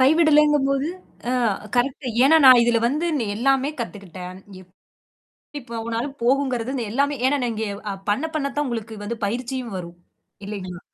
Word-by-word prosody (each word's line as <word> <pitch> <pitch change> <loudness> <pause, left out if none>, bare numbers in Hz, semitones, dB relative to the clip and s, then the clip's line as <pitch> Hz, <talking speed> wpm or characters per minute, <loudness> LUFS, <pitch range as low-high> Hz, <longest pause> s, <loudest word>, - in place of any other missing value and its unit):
கைவிடலங்கும்போது, 295 -1 +4 0.4
ஆ - - 0 0.4
correct. 255 +1 0 0.2
ஏன்னா, 320 +4 +6
நான் 255 -2 +9
இதல 235 -1 +3
வந்து 300 +7 0
நா 235 - -1
எல்லாமே 270 +4 +2
கத்துக்கிட்டேன் 185 -4 -7 0.2
எப் 180 -1 -19 0.9
எப்பவேனாலும் 235 +2 -4
போகுங்கறது 260 -1 +1 0.2
எல்லாமே. 280 +4 +1
ஏன்னா 265 -2 +1
இங்க, 220 0 -3 0.4
பண்ண 210 +10 +1
பண்ண 295 -3 -1
தான் 295 0 0
உங்களுக்கு 225 -3 -4
வந்து 235 +3 -3
பயிற்சியும் 245 +2 -3
வரும், 170 -1 -8 0.5
இல்லைங்களா? 185 -3 -6
250 Hz, 130 wpm, -23 LUFS, 220-280 Hz, 0.9 s, நான்